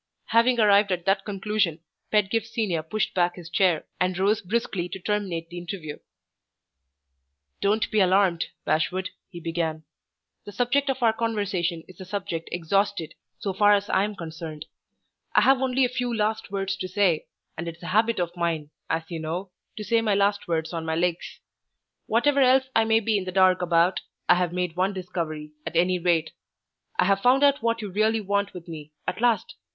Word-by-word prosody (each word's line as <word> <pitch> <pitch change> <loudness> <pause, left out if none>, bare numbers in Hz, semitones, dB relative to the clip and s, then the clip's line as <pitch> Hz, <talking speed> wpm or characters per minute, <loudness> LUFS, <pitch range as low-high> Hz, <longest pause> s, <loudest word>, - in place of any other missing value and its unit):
Having 235 +2 +4
arrived 205 -1 +5
at 180 -1 -2
that 195 0 +1
conclusion, 200 -4 -1 0.3
Pedgift 210 +1 +1
Senior 210 -8 -1
pushed 195 +7 -2
back 175 -1 +1
his 170 -2 -10
chair, 180 -4 +2
and 180 0 0
rose 200 +3 +2
briskly 190 -3 -2
to 190 - -5
terminate 185 -4 -2
the 175 0 -6
interview. 170 -4 -6 1.6
"Don't 210 +2 +1
be 215 - +2
alarmed, 185 -2 +3 0.2
Bashwood," 185 +4 0 0.2
he 175 -3 -9
began. 165 -1 -2 0.6
"The 205 - -10
subject 275 +5 +1
of 265 -2 -1
our 225 -1 +5
conversation 200 -7 -1
is 185 0 -14
a - - -7
subject 180 -4 -4
exhausted, 175 0 0 0.2
so 195 - -3
far 205 +2 +5
as 205 0 0
I 190 - +3
am 210 0 -3
concerned. 160 -3 -7 0.7
I - - +7
have 270 -1 +4
only 260 0 +2
a - - +2
few 245 0 -2
last 220 -1 -1
words 195 -1 -2
to 190 -1 -4
say, 185 -4 +1 0.3
and 170 +1 -5
it's 170 +1 -8
a 180 +2 -4
habit 225 +2 +3
of 175 0 -2
mine, 165 -4 -2 0.2
as 165 0 0
you 165 - -3
know, 175 +4 -4 0.3
to 215 - -4
say 230 +1 +2
my 215 -3 +1
last 200 0 +1
words 160 0 -1
on 165 -1 -3
my 160 0 -1
legs. 170 0 -2 0.7
Whatever 280 +6 +3
else 260 0 +4
I 225 - +4
may 225 0 +3
be 215 -1 +1
in 185 - -6
the 185 - -4
dark 185 0 +4
about, 175 +1 +2 0.3
I - - +7
have 180 -1 0
made 180 -2 -2
one 190 +2 +1
discovery, 165 -5 -5
at - - -6
any 180 +2 +3
rate. 165 -2 +1 0.7
I 180 - +3
have 195 +1 +2
found 260 +4 +4
out 280 -1 +4
what 230 -1 0
you 205 - -5
really 215 +3 +2
want 200 -1 -1
with 175 -1 -9
me 155 -2 -9
at 180 +4 -3
last! 240 -2 +2
190 Hz, 190 wpm, -25 LUFS, 170-215 Hz, 1.6 s, I